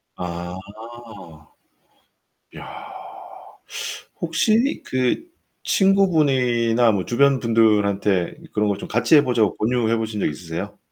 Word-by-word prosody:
아. 90 0 -6 2.0
야. - - -10 1.4
혹시 215 - +1
그 130 - -1 0.3
친구분이나 130 - +2
뭐 95 -3 -2
주변 135 +2 +2
분들한테 105 -5 +1 0.2
그런 105 0 +1
거 100 - -1
좀 - - -8
같이 120 +8 +3
해 145 - +6
보자고 115 -6 +1
권유해 115 0 0
보신 110 -2 -4
적 - - +1
있으세요? 80 +2 -6
115 Hz, 205 characters per minute, -21 LUFS, 100-140 Hz, 2.0 s, 해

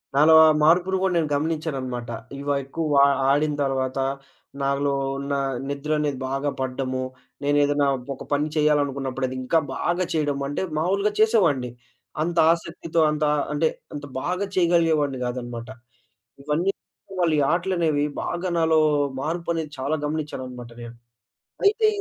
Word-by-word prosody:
నాలో 155 +3 +6
ఆ - - +7 0.2
మార్పును 180 +4 +4
గూడా 190 -1 +1
నేను 160 -3 0
గమనించాననమాట. 140 -6 -2 0.3
ఇవా 145 0 -1
ఎక్కువ 160 +5 -4
వా 140 - +7 0.3
ఆడిన 150 +2 +2
తరవాత, 135 -1 -1 0.6
నాలో 140 +1 +1 0.2
ఉన్న 140 +1 -3 0.4
నిద్రనేది 145 -1 -1
బాగా 135 +2 -1
పడ్డము, 130 0 -2 0.4
నేనేదన్నా 145 0 +2 0.3
ఒక - - -9
పని 145 +1 +1
చేయాలనుకున్నప్పుడు, 140 -3 +1
అదింకా 130 +5 0 0.2
బాగా 175 +1 0
చేయడము, 145 -3 0
అంటే 145 +5 -3 0.2
మామూలుగా 195 +6 +1
చేసేవాడిని, 175 - +3 0.5
అంత 170 +1 -3 0.2
ఆసక్తితో, 170 -1 -2
అంత 150 0 0 0.3
అంటే, 155 +2 +2 0.3
అంత 145 0 -6 0.2
బాగా 180 +3 -1
చేయగలిగేవాడిని 165 -6 +2
గాదనమాట. 120 -1 -5 0.8
ఇవన్నీ 150 +6 0 0.4
కూడా 190 -1 -8
మళ్ళీ 160 -3 +2
ఆటలనేవి 170 -4 +1 0.2
బాగా 180 +2 -3
నాలో 160 -1 +4 0.4
మార్పనేది 165 0 -2
చాలా 140 +4 -1
గమనిచ్చాననమాట 130 -5 -5
నేను. 120 0 -9 0.7
అయితే 435 +2 +4
150 Hz, 125 wpm, -24 LUFS, 135-165 Hz, 0.8 s, ఆ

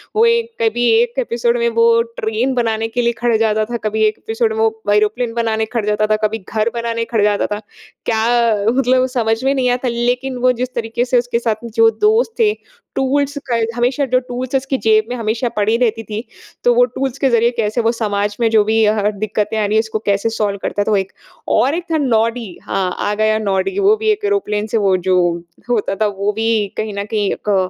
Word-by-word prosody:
वो 445 +2 +4
एक 465 0 +2
कभी 235 +2 +1
1 240 +2 -1
एपिसोड 235 -1 0
में 235 - +1
वो 230 0 +5 0.2
ट्रेन 225 +4 -1
बनाने 225 -2 0
के 245 +2 -2
लिए 235 0 +1
खड़े 240 0 +2
हो - - +1
जाता 215 -1 +1
था। - - 0
कभी 220 +1 -2
1 215 - -2
एपिसोड 225 0 -1
में - - -2
वो 220 -1 0
एरोप्लेन 215 +3 0
बनाने 225 -1 0
खड़े 220 -2 -2
हो 210 - +2
जाता 215 0 +1
था, 215 - +2
कभी 220 +1 -5
घर 220 +1 0
बनाने 230 -1 -2
खड़े 220 -3 0
हो 210 - +4
जाता - - -1
था। 210 - -7 0.4
क्या 225 -2 +1
मतलब 255 0 +2
समझ 225 0 0
में 270 +1 +2
नहीं 255 -2 +1
आता, 250 +1 -1
लेकिन 245 +2 -1
वो 255 +1 +3
जिस 255 0 -3
तरीके 235 +1 -1
से 250 0 +2
उसके 240 -1 -1
साथ 230 -1 -2
जो 225 0 +6
दोस्त 440 +2 +3
थे, 425 -2 +4 0.4
टूल्स 280 +2 0
क 230 -1 +1
हमेशा 250 +4 +1
जो 255 - +5
टूल्स 255 +1 -5
उसकी 270 0 0
जेब 215 -1 +4
में 250 - -3
हमेशा 230 +1 -1
पड़ी 210 +2 +2
रहती 230 -2 0
थी। 215 +2 -5 0.4
तो 485 0 +4
वो - - +5
टूल्स 270 - -4
के 270 - +2
ज़रिये 235 0 +3
कैसे 225 +1 0
वो 230 +1 +2
समाज 205 -3 -2
में 230 -1 +2
जो 220 -2 +5
भी 220 +1 +2
अह 210 -1 +2
दिक्कतें 215 +1 -2
आ 215 - +1
रही 205 +1 0
हैं, 220 - +5
उसको 220 -1 -2
कैसे 200 +2 +1
टूल्स 200 -2 -1
करता 205 - -1
था, 215 - -1
वो 205 - +3
एक 190 0 -2 0.4
और 275 +5 +2
एक 350 - -3
था 320 - +2
नॉडी, 230 -4 0 0.2
हाँ, 185 -2 -1
आ 205 - 0
गया 215 0 +2
नॉडी। 200 - -1
वो 400 +2 +4
भी 440 0 -1
एक 420 0 -2
एरोप्लेन 220 - -1
से 225 - -1
वो 195 -3 +2
जो 185 - +4 0.5
होता 215 -4 0
था, 215 +2 +1
वो 200 0 -1
भी 225 -1 0
कहीं 215 -1 -3
न 200 - -3
कहीं 205 -2 +1 0.2
क 190 -2 +2
230 Hz, 230 wpm, -17 LUFS, 215-250 Hz, 0.5 s, जो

